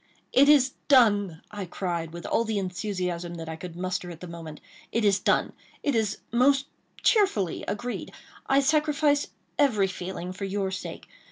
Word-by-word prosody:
"It 280 Hz, +2 st, +6 dB
is 275 Hz, -3 st, +6 dB, 0.2 s
done!" 205 Hz, -, +4 dB
I 205 Hz, -2 st, -5 dB
cried, 170 Hz, -2 st, -3 dB
with 170 Hz, 0 st, -8 dB
all 230 Hz, -, +2 dB
the 220 Hz, -2 st, -2 dB
enthusiasm 180 Hz, -2 st, -3 dB
that 165 Hz, -1 st, -7 dB
I 160 Hz, -, -4 dB
could 170 Hz, +1 st, -8 dB
muster 180 Hz, 0 st, -3 dB
at 170 Hz, -2 st, -9 dB
the 180 Hz, -, -8 dB
moment. 165 Hz, -3 st, -8 dB, 0.3 s
"It 230 Hz, -1 st, +1 dB
is 200 Hz, -1 st, +4 dB
done—it 285 Hz, -, -1 dB
is 220 Hz, -3 st, +1 dB
most 270 Hz, +3 st, +4 dB, 0.4 s
cheerfully 300 Hz, -, +2 dB
agreed. 240 Hz, +4 st, -4 dB, 0.4 s
I 275 Hz, +1 st, +4 dB
sacrifice 300 Hz, 0 st, +2 dB, 0.3 s
every 235 Hz, -9 st, +4 dB
feeling 185 Hz, -1 st, -5 dB
for 195 Hz, +2 st, -5 dB
your 195 Hz, 0 st, -1 dB
sake. 190 Hz, -, -6 dB
200 Hz, 160 wpm, -27 LUFS, 180-255 Hz, 0.4 s, It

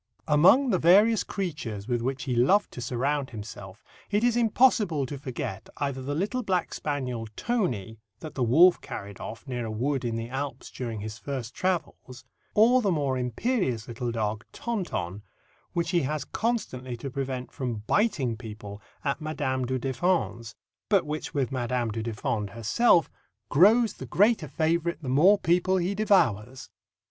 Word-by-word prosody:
Among 185 Hz, -, +5 dB
the 185 Hz, -, +2 dB
various 205 Hz, +6 st, +5 dB
creatures 130 Hz, -, -4 dB
with 120 Hz, -2 st, 0 dB
which 130 Hz, +3 st, -2 dB
he 130 Hz, -, -2 dB
loved 185 Hz, +13 st, +3 dB
to 125 Hz, -, -7 dB
surround 130 Hz, +3 st, -1 dB
himself, 105 Hz, -3 st, -9 dB, 0.3 s
it 205 Hz, +2 st, +1 dB
is 240 Hz, -1 st, +3 dB
impossible 220 Hz, -, +3 dB
to 140 Hz, +1 st, -6 dB
forget 130 Hz, -8 st, -5 dB
either 140 Hz, -2 st, -2 dB
the 145 Hz, +3 st, -3 dB
little 205 Hz, +10 st, -1 dB
black 185 Hz, -6 st, -1 dB
spaniel, 125 Hz, -6 st, -3 dB
Tony, 120 Hz, -, -2 dB, 0.2 s
that 155 Hz, -, -8 dB
the 130 Hz, -, -4 dB
wolf 160 Hz, +10 st, +5 dB
carried 100 Hz, -1 st, -7 dB
off 115 Hz, +6 st, -8 dB
near 125 Hz, -2 st, -3 dB
a -, -, -4 dB
wood 130 Hz, +5 st, -1 dB
in 115 Hz, -2 st, -2 dB
the 115 Hz, 0 st, -3 dB
Alps 130 Hz, 0 st, -5 dB
during 115 Hz, -4 st, -5 dB
his 110 Hz, +2 st, -6 dB
first 130 Hz, -4 st, -5 dB
travels, 165 Hz, -8 st, -3 dB, 0.3 s
or 240 Hz, +4 st, +6 dB
the 205 Hz, -, +1 dB
more 140 Hz, -5 st, 0 dB
imperious 125 Hz, -, -1 dB
little 120 Hz, 0 st, -3 dB
dog, 110 Hz, -1 st, -2 dB
Tonton, 175 Hz, -, -3 dB, 0.5 s
which 170 Hz, -1 st, -1 dB
he 175 Hz, -2 st, +3 dB
has 150 Hz, +2 st, -2 dB
constantly 130 Hz, -, -2 dB
to 135 Hz, +3 st, -6 dB
prevent 130 Hz, -2 st, -4 dB
from 120 Hz, -5 st, -4 dB
biting 145 Hz, -, +1 dB
people 105 Hz, -3 st, -9 dB, 0.2 s
at 140 Hz, +2 st, -1 dB
Madame 140 Hz, -4 st, -2 dB
du 130 Hz, +1 st, -1 dB
Deffand's, 130 Hz, -3 st, -1 dB, 0.3 s
but 200 Hz, -3 st, +3 dB
which 150 Hz, 0 st, -5 dB
with 135 Hz, -2 st, 0 dB
Madame 120 Hz, -2 st, -1 dB
du 110 Hz, +1 st, -3 dB
Deffand 110 Hz, -1 st, -2 dB
herself 165 Hz, -, +3 dB, 0.4 s
"grows 215 Hz, +8 st, +5 dB
the -, -, -9 dB
greater 205 Hz, -4 st, +3 dB
favourite 165 Hz, +3 st, 0 dB
the 130 Hz, -, -3 dB
more 175 Hz, +11 st, +6 dB
people 180 Hz, +1 st, +2 dB
he 180 Hz, +2 st, 0 dB
devours." 130 Hz, -, +1 dB
135 Hz, 160 wpm, -27 LUFS, 120-180 Hz, 0.5 s, or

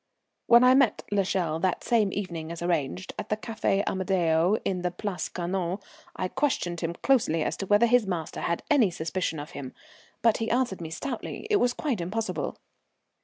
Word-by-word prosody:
When 235 Hz, +1 st, +7 dB
I 250 Hz, 0 st, +7 dB
met 265 Hz, -5 st, +3 dB
l'Echelle 185 Hz, -5 st, 0 dB
that 185 Hz, +1 st, 0 dB
same 220 Hz, -5 st, +2 dB
evening 170 Hz, -5 st, -4 dB
as 170 Hz, 0 st, -6 dB
arranged, 175 Hz, +1 st, -1 dB
at -, -, -5 dB
the 215 Hz, -, +1 dB
Café 215 Hz, -3 st, 0 dB
Amadeo 180 Hz, 0 st, +2 dB
in 185 Hz, -2 st, -1 dB
the 180 Hz, -, 0 dB
Place 180 Hz, +1 st, -4 dB
Carnot, 180 Hz, +1 st, -2 dB, 0.4 s
I 185 Hz, -, -1 dB
questioned 185 Hz, -, -1 dB
him 170 Hz, 0 st, -2 dB
closely 215 Hz, -, +3 dB
as -, -, -1 dB
to 195 Hz, -, -4 dB
whether 205 Hz, +4 st, +5 dB
his 235 Hz, -2 st, +3 dB
master 170 Hz, -4 st, -3 dB
had 170 Hz, -, -1 dB
any 255 Hz, -9 st, +5 dB
suspicion 165 Hz, -1 st, -2 dB
of 145 Hz, +2 st, -7 dB
him, 130 Hz, -2 st, -7 dB, 0.5 s
but 230 Hz, -2 st, +4 dB
he 225 Hz, 0 st, -2 dB
answered 240 Hz, -7 st, 0 dB
me 160 Hz, -, -5 dB
stoutly 235 Hz, -, -5 dB
it 420 Hz, -, +5 dB
was 245 Hz, -9 st, +2 dB
quite 255 Hz, -, -2 dB
impossible. 215 Hz, +6 st, -3 dB
190 Hz, 180 wpm, -27 LUFS, 170-225 Hz, 0.5 s, When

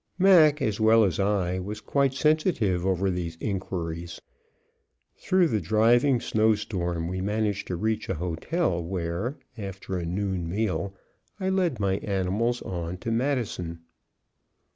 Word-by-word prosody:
Mac, 160 Hz, -6 st, +6 dB
as 110 Hz, -4 st, -1 dB
well 110 Hz, +1 st, +5 dB
as 90 Hz, -6 st, 0 dB
I, 95 Hz, -2 st, +1 dB
was 105 Hz, +3 st, -5 dB
quite 135 Hz, +4 st, +1 dB
sensitive 140 Hz, -, +1 dB
over 95 Hz, 0 st, +1 dB
these 85 Hz, -2 st, -4 dB
inquiries. 85 Hz, -4 st, -4 dB, 1.0 s
Through 185 Hz, -3 st, +2 dB
the 110 Hz, -5 st, 0 dB
driving 120 Hz, +5 st, +3 dB
snow 110 Hz, -1 st, +2 dB
storm 90 Hz, -5 st, -3 dB
we 95 Hz, +1 st, -3 dB
managed 105 Hz, 0 st, -1 dB
to 90 Hz, -, -2 dB
reach 110 Hz, +5 st, -2 dB
a -, -, 0 dB
hotel 85 Hz, -, -1 dB
where, 90 Hz, -, -3 dB, 0.2 s
after 95 Hz, -2 st, -5 dB
a 85 Hz, -, -4 dB
noon 95 Hz, -1 st, -2 dB
meal, 100 Hz, 0 st, -1 dB, 0.4 s
I 190 Hz, -1 st, -1 dB
led 180 Hz, -, +1 dB
my 95 Hz, -1 st, +1 dB
animals 100 Hz, +5 st, -1 dB
on 85 Hz, -1 st, -4 dB
to 115 Hz, +5 st, -4 dB
Madison. 115 Hz, -10 st, -1 dB
100 Hz, 140 wpm, -26 LUFS, 90-120 Hz, 1.0 s, Mac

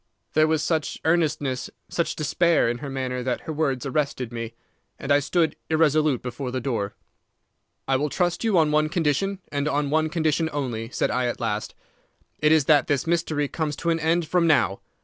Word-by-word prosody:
"There 155 Hz, 0 st, +4 dB
was 155 Hz, -1 st, +1 dB
such 160 Hz, -1 st, -1 dB
earnestness, 155 Hz, -6 st, +1 dB, 0.2 s
such 170 Hz, -, -1 dB
despair, 165 Hz, 0 st, +2 dB
in 120 Hz, +1 st, -1 dB
her 140 Hz, -, -6 dB
manner 130 Hz, -2 st, -3 dB
that 125 Hz, 0 st, -2 dB
her 160 Hz, -, -5 dB
words 145 Hz, -4 st, -1 dB
arrested 135 Hz, -3 st, -1 dB
me, 115 Hz, -1 st, -5 dB, 0.4 s
and 140 Hz, -, -4 dB
I 145 Hz, -, +6 dB
stood 160 Hz, +2 st, +1 dB
irresolute 155 Hz, -4 st, +2 dB
before 125 Hz, +1 st, -4 dB
the 130 Hz, +1 st, -2 dB
door. 115 Hz, -6 st, -2 dB, 0.9 s
"'I 135 Hz, -1 st, +3 dB
will 150 Hz, +2 st, -1 dB
trust 175 Hz, +5 st, 0 dB
you 220 Hz, -5 st, +2 dB
on 155 Hz, -2 st, +4 dB
one 155 Hz, 0 st, +2 dB
condition, 175 Hz, +4 st, 0 dB
and 145 Hz, 0 st, -1 dB
on 145 Hz, -1 st, 0 dB
one 155 Hz, 0 st, +2 dB
condition 160 Hz, 0 st, 0 dB
only,' 120 Hz, -6 st, -3 dB
said -, -, -1 dB
I 125 Hz, 0 st, 0 dB
at 120 Hz, -, -3 dB
last. 110 Hz, -3 st, -3 dB, 0.6 s
'It 150 Hz, 0 st, +3 dB
is 160 Hz, -3 st, +4 dB
that 145 Hz, -2 st, +4 dB
this 140 Hz, -3 st, 0 dB
mystery 160 Hz, -3 st, 0 dB
comes 150 Hz, 0 st, -3 dB
to 170 Hz, -, -1 dB
an 165 Hz, -, 0 dB
end 165 Hz, +1 st, +1 dB
from 175 Hz, 0 st, +2 dB
now. 135 Hz, -10 st, +3 dB
150 Hz, 190 wpm, -24 LUFS, 130-160 Hz, 0.9 s, I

